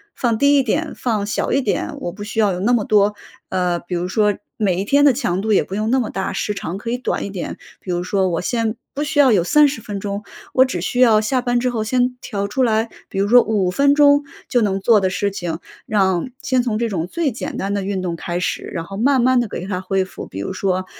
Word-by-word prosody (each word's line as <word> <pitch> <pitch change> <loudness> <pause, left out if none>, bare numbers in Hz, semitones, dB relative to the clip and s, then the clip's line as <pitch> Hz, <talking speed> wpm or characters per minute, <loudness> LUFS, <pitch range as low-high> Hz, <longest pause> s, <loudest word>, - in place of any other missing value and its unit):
放 235 -3 0
低 280 +4 +4
一 275 - +3
点、 300 +7 -1
放 220 -5 -1
小 210 - -2
一 275 - +2
点， 265 - -2
我 175 - -4
不 205 +4 -8
需 215 +2 -4
要 210 -2 +4
有 180 - -4
那 220 +6 +2
么 230 -3 +2
多 210 -1 +3 0.3
呃， 180 -2 0
比 175 +2 -8
如 175 +1 -2
说 210 +1 +2 0.2
每 190 -5 +1
一 - - -3
天 285 +6 +4
的 280 - +6
强 210 -8 -1
度 215 +1 +1
也 - - +4
不 - - -9
用 215 +2 -1
那 260 +2 +3
么 235 - -2
大， 190 - -3
时 210 - -2
长 190 -2 -5
可 230 +3 -6
以 245 - -1
短 250 - -2
一 - - -5
点。 190 -3 -5 0.2
比 185 - -6
如 175 0 -1
说 190 0 +1
我 170 -2 -1
先 225 +3 -1 0.2
不 290 - -2
需 300 0 -1
要 270 -3 +6
有 195 -6 +3
30 290 - +3
分 205 -2 -5
钟， 200 +1 -4 0.3
我 260 - +6
只 180 -10 -3
需 245 +7 -2
要 230 -4 +6
下 250 +4 0
班 245 -1 +1
之 250 +1 0
后 225 -3 -2
先 250 +3 +1
调 200 -3 -3
出 235 +6 -2
来， 225 -2 +2 0.2
比 - - -7
如 200 +1 +2
说 245 +3 +7
5 205 -5 0
分 280 +7 +3
钟 285 0 +5 0.2
就 245 - +2
能 195 -3 +1
做 215 +2 +4
的 190 -1 +1
事 200 +2 -1
情， 175 -4 -4 0.3
让 190 -1 +1
先 260 -2 +2
从 235 -3 -1
这 230 +1 -1
种 175 -5 -2
最 320 - -1
简 280 +6 -5
单 195 +1 -2
的 200 - -1
运 190 -1 -2
动 175 -2 -2
开 175 +1 -4
始， 180 - -2
然 165 -2 -5
后 195 +3 -8
慢 265 +5 +3
慢 255 0 +4
地 240 - 0
给 185 -3 -6
它 185 -2 -3
恢 190 0 0
复。 185 - -9
比 95 - -8
如 100 - -4
说， 185 -1 -1
215 Hz, 280 characters per minute, -20 LUFS, 190-250 Hz, 0.3 s, 说